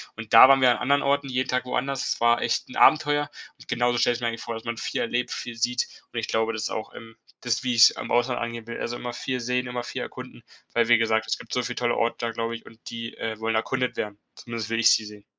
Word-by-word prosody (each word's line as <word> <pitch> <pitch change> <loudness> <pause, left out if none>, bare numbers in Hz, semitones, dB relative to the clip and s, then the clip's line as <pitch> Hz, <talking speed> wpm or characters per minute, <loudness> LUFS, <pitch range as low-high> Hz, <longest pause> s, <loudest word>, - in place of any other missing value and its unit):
und 110 0 -9
da 115 - +11
waren 135 0 +5
wir 125 -1 +6
an - - +1
anderen 140 +3 +2
Orten 140 0 +1
jeden 130 0 -2
Tag 125 0 0
woanders, 135 +1 -2
es - - -12
war 120 0 +4
echt - - -1
'n 125 - -8
Abenteuer 145 -1 +4 0.3
und - - -16
genauso 120 0 +1
stelle 120 0 +2
ich 120 - -7
mir 120 - 0
eigentlich 115 0 -3
vor, 115 - -5
dass 115 - -8
man 115 -1 -4
viel - - -3
erlebt, 120 +1 -1
viel 120 - -5
sieht 125 +2 0 0.3
und 120 - -2
ich 115 - -5
glaube, 110 0 0
das 110 - -4
ist - - -1
auch 110 - -5
im 115 0 -12 0.2
das, 120 -2 0
wie 125 -1 +1
ich's 115 - +9
im - - -7
Ausland 120 +1 +1
angehen 115 -1 -5
will, 115 - -6
also 120 - -3
immer 120 0 -5
viel 125 +1 -4
sehen, 125 +1 -1
immer 125 0 -4
viel - - -5
erkunden, - - -9 0.3
weil 120 -1 +2
wie 120 0 +6
gesagt, 110 -1 +1
es - - -1
gibt - - -13
so 125 - +1
viel 125 0 -4
tolle 120 -1 0
Orte 115 0 +1
da, 115 -1 -2
glaube 115 0 -3
ich, 115 - -11
und 115 - -15
die, 115 0 -7
äh, 110 -1 -4
wollen 110 +1 -1
erkundet 125 +3 -1
werden, 105 -1 -4 0.2
zumindest 115 -3 -6
will 115 0 -1
ich 115 - +6
sie - - +1
sehen. 105 -1 -12
120 Hz, 280 wpm, -25 LUFS, 115-125 Hz, 0.3 s, da